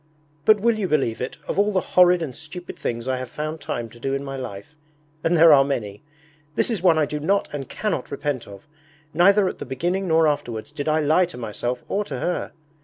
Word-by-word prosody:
But 215 -1 +6
will 225 +1 +2
you 195 - 0
believe 135 -8 0
it, 125 - -4
of - - -1
all 205 +1 +3
the 190 - +2
horrid 180 -1 +6
and 130 -6 -6
stupid 160 +3 -8
things 115 +1 -4
I 130 -1 0
have 130 -1 -6
found 155 +3 -5
time 120 -5 -3
to 120 - -15
do 135 +3 -1
in 140 - -3
my 135 -1 -5
life 125 0 -7 0.5
and 170 +1 +2
there 160 -1 +8
are 135 -1 +7
many 105 -8 -3 0.5
this - - +1
is 215 -7 -2
one 175 -3 +4
I 155 - +3
do 150 +1 -4
not 195 +7 +1
and 140 -3 -5
cannot 210 -11 -2
repent 140 -3 -3
of. 100 +5 -12 0.5
Neither 195 +4 +5
at - - -4
the - - -4
beginning 175 +9 -2
nor 160 -1 +4
afterwards 145 -4 -2
did 145 0 -3
I 155 +1 +2
lie 155 +5 +4
to 175 - -10
myself 120 +2 -4
or 205 - 0
to 135 - -5
her. 175 +8 -2
150 Hz, 230 wpm, -23 LUFS, 130-180 Hz, 0.5 s, there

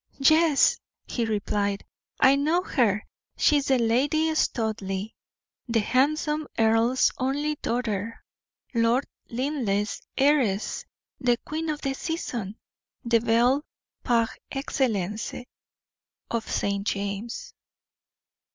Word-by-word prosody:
"Yes," 310 +1 +4 0.3
he 235 - -2
replied, 205 -2 -1 0.3
"I 265 +1 +6
know 315 +6 +1
her. 215 - +1 0.3
She 295 - +4
is 285 - -1
the 265 - +4
Lady 285 +8 +2
Studleigh, 215 -8 -1 0.6
the 230 -1 +2
handsome 300 +6 +1
earl's 225 +3 +3
only 285 +3 0
daughter, 230 -2 -2 0.5
Lord 235 +3 +2 0.2
Linleigh's 235 -6 -1 0.2
heiress, 265 -8 +2 0.3
the 245 -2 +2
queen 315 +1 -3
of 300 -1 -3
the 275 -1 -1
season, 240 - -4 0.5
the 235 -1 +4
belle, 240 +5 +3 0.4
par 230 -2 +3 0.2
excellence, 220 -7 -1 1.0
of 230 -1 -2
St. 200 0 -1
James'." 205 - -3
240 Hz, 100 wpm, -26 LUFS, 220-285 Hz, 1.0 s, I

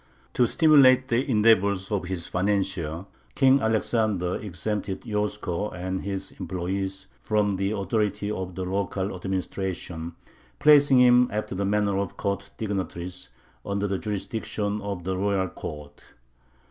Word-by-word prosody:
To 125 - +3
stimulate 135 -4 +5
the 125 +4 +1
endeavors 100 -4 +3
of 100 -3 -1
his 90 -2 -4
financier, 90 -3 -1 0.3
King 135 0 +5
Alexander 110 -4 +1
exempted 100 0 -4
Yosko 105 -3 -2
and 95 0 -4
his 95 -1 -4
employees 95 +1 -3
from 105 -2 0
the 95 +1 0
authority 105 +1 -1
of 95 -3 -4
the 95 - -3
local 95 +1 -2
administration, 90 -2 -4 0.4
placing 145 -3 +6
him, 125 0 +6
after 105 -1 -3
the 100 +1 -1
manner 100 -1 +1
of 100 - -4
court 100 0 -2
dignitaries, 90 -4 -4 0.3
under 100 0 -2
the 95 -1 -2
jurisdiction 105 0 -3
of 100 -3 -5
the 95 +1 -2
royal 95 -1 0
court. 75 -2 -8
100 Hz, 130 wpm, -26 LUFS, 95-105 Hz, 0.4 s, placing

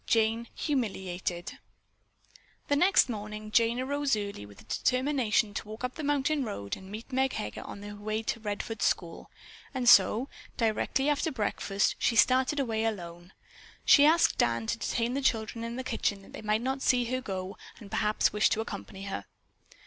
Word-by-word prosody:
JANE 225 +1 +2
HUMILIATED 190 - -3 1.1
The 285 - +4
next 365 +6 +5
morning 215 -2 -6
Jane 230 +2 +3
arose 285 +1 0
early 200 - -5
with 100 -1 -15
the - - -14
determination 255 -5 +1
to 210 - -5
walk 215 +3 -8
up 250 0 -2
the 315 - -6
mountain 290 0 +1
road 100 - -4
and 190 0 -12
meet 220 +6 -8
Meg 265 0 +2
Heger 105 - -4
on 200 - -9
her 205 0 -7
way 215 +2 -3
to 230 - -2
the 215 -1 -5
Redfords 205 +1 -4
school. 170 -2 -1 0.5
And 250 -2 -1
so, 220 +3 +6 0.3
directly 230 +4 +1
after 295 +2 +1
breakfast, 205 -4 0
she 235 - +2
started 260 +5 +4
away 225 -5 0
alone. 175 -4 -4 0.5
She 285 - +7
asked 325 +3 +4
Dan 115 -1 +2
to 225 - -2
detain 235 +1 -1
the 275 - -1
children 230 -2 0
in 230 0 -4
the 260 - -4
kitchen 205 -5 -1
that - - -16
they - - -7
might 215 +1 +1
not 265 +1 -1
see 245 -2 +3
her 255 +2 -2
go 190 -3 -5 0.2
and 205 -3 -12
perhaps 210 -1 +1
wish 210 0 +4
to 220 - 0
accompany 195 -3 -7
her. 195 - -5
225 Hz, 180 wpm, -29 LUFS, 205-255 Hz, 1.1 s, She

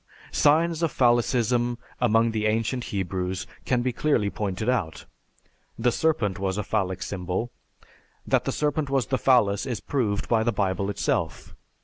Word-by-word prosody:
Signs 165 +2 +3
of 165 -3 +1
phallicism 120 -1 +2 0.2
among 115 -1 +3
the 110 -1 0
ancient 115 +3 0
Hebrews 95 -1 -3 0.2
can 125 -2 +1
be 125 -1 0
clearly 120 -8 +1
pointed 105 +1 -3
out; 100 -11 -1 0.7
the 120 +1 +2
serpent 115 - 0
was 95 0 -1
a 105 - -1
phallic 95 -3 -1
symbol. 95 +5 -3 0.7
"That - - +1
the - - 0
serpent 150 -1 -1
was 135 -3 +1
the 130 - -1
phallus 110 -5 +3
is 120 -5 -2
proved 110 -8 -1
by 115 -1 +2
the 120 +1 +1
Bible 100 -2 -1
itself. 80 -6 -2
115 Hz, 150 wpm, -25 LUFS, 100-125 Hz, 0.7 s, Signs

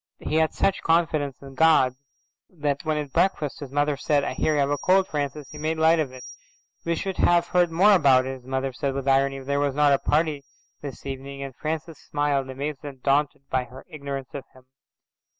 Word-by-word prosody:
He 155 - -2
had 160 0 +3
such 195 - +1
confidence 160 -4 +1
in 135 -1 -10
God 155 -4 +4 0.6
that 145 -4 -2
when 155 -1 -1
at 145 -3 -5
breakfast 175 -7 0
his 140 -3 -7
mother 145 +1 +1
said, 145 +1 +1
"I - - -2
hear 155 - 0
you - - +1
have 140 0 +1
a 145 - +1
cold, 190 +1 +3
Francis," 145 -1 -4
he 150 - -9
made 160 +1 -1
light 160 +1 +4
of 145 -5 -1
it. 130 -1 -11 0.6
"We 170 0 0
should 190 +3 -4
have 175 0 +3
heard 180 -1 +3
more 195 +6 +5
about 135 -8 +5
it," 130 0 -4
his 125 - -19
mother 130 0 -2
said 135 +2 -2
with 135 0 -4
irony, 135 0 +3
"if 135 - -9
there 140 +1 0
was 140 -2 0
not 145 -1 +4
a 140 - +2
party 150 -2 0 0.4
this 140 -2 -8
evening," 140 +1 -6
and 135 -2 -8
Francis 160 +1 -4
smiled, 145 -2 -1
amazed 140 +2 -5
and 135 -3 -9
daunted 140 0 +1
by 130 -1 0
her 130 +2 -13
ignorance 140 -3 -6
of 140 - -6
him. 130 - -17
145 Hz, 220 wpm, -25 LUFS, 135-155 Hz, 0.6 s, more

